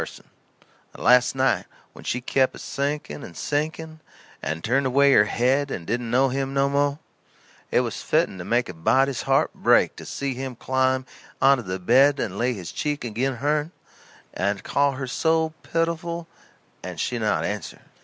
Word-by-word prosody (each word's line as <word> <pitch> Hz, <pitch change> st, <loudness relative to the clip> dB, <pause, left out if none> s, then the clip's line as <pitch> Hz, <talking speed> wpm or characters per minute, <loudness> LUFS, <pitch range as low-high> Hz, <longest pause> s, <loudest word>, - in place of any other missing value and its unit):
And -, -, -13 dB
last 125 Hz, +1 st, +5 dB
night 130 Hz, -2 st, +1 dB, 0.3 s
when -, -, -13 dB
she 125 Hz, -, -2 dB
kep' 130 Hz, +1 st, +1 dB
a -, -, -9 dB
sinking 140 Hz, -, -3 dB
and 85 Hz, -, -10 dB
sinking, 155 Hz, +2 st, -3 dB, 0.4 s
and 80 Hz, +1 st, -4 dB
turned 135 Hz, +4 st, +1 dB
away 140 Hz, +2 st, +4 dB
her 105 Hz, -, +6 dB
head 130 Hz, +6 st, +1 dB
and 85 Hz, -, -5 dB
didn't 120 Hz, +3 st, -2 dB
know 130 Hz, +3 st, +3 dB
him 135 Hz, +1 st, -2 dB
no 140 Hz, 0 st, +3 dB
mo', 140 Hz, 0 st, +1 dB, 0.7 s
it -, -, +3 dB
was -, -, -4 dB
fitten 95 Hz, -, 0 dB
to -, -, -5 dB
make 120 Hz, +5 st, +1 dB
a 90 Hz, -, -7 dB
body's 130 Hz, +10 st, +2 dB
heart -, -, +2 dB
break -, -, +3 dB
to -, -, -9 dB
see 140 Hz, -1 st, -3 dB
him 130 Hz, 0 st, -5 dB
climb 130 Hz, +1 st, 0 dB, 0.3 s
onto 135 Hz, -1 st, +5 dB
the 95 Hz, -3 st, -4 dB
bed 130 Hz, +9 st, +4 dB
and 100 Hz, -1 st, -3 dB
lay 125 Hz, +2 st, +1 dB
his 90 Hz, -6 st, -7 dB
cheek 145 Hz, -3 st, -3 dB
agin 120 Hz, +4 st, -1 dB
hern 150 Hz, +5 st, 0 dB, 0.6 s
and 100 Hz, +2 st, -1 dB
call 140 Hz, 0 st, +1 dB
her 135 Hz, 0 st, -4 dB
so 160 Hz, +4 st, +1 dB
pitiful 170 Hz, 0 st, -2 dB, 0.5 s
and -, -, -7 dB
she -, -, -1 dB
not -, -, 0 dB
answer. -, -, -5 dB
130 Hz, 175 wpm, -24 LUFS, 120-145 Hz, 0.7 s, her